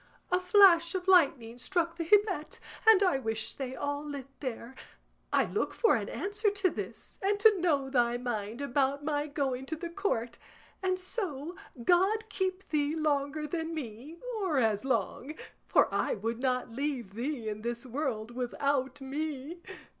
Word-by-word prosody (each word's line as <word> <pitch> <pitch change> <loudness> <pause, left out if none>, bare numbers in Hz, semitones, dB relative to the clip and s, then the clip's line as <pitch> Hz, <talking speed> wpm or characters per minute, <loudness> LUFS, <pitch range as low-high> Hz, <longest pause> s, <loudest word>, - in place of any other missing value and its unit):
A 360 - +4
flash 365 -3 +6
of 370 0 -3
lightning 270 -10 +4
struck 340 +3 0
the 335 - -3
gibbet, 390 -4 +2 0.3
and 425 -3 +8
I 360 -8 +3
wish 220 -3 -2
they 265 -1 -5
all 285 0 -2
lit 285 -3 -6
there. 250 -2 -5 0.6
I - - +3
look - - -2
for 460 - +4
an - - -2
answer 415 +2 0
to 395 -3 +1
this, 215 0 -7
and 405 +1 +1
to 430 -3 +6
know 290 -6 +2
thy 240 -2 +2
mind 235 -1 -4
about 280 +1 0
my 295 -1 0
going 270 -3 -2
to 320 - -2
the 335 +2 -5
Court; 340 - -2 0.4
and 370 -1 +1
so, 360 - -4 0.3
God 390 - +3
keep 380 -1 -2
thee 300 0 +1
longer 300 -1 0
than 325 +1 -3
me, 270 +3 -7 0.2
or 355 -7 +1
as 220 -4 +2
long, 270 +2 -1 0.3
for - - +5
I - - +1
would 225 +3 -3
not 250 -2 0
leave 255 -5 -3
thee 240 +1 -3
in 215 0 -4
this 235 +2 -4
world 245 -4 -3
without 260 +2 -1
me. 295 +3 -4
285 Hz, 160 wpm, -30 LUFS, 250-355 Hz, 0.6 s, and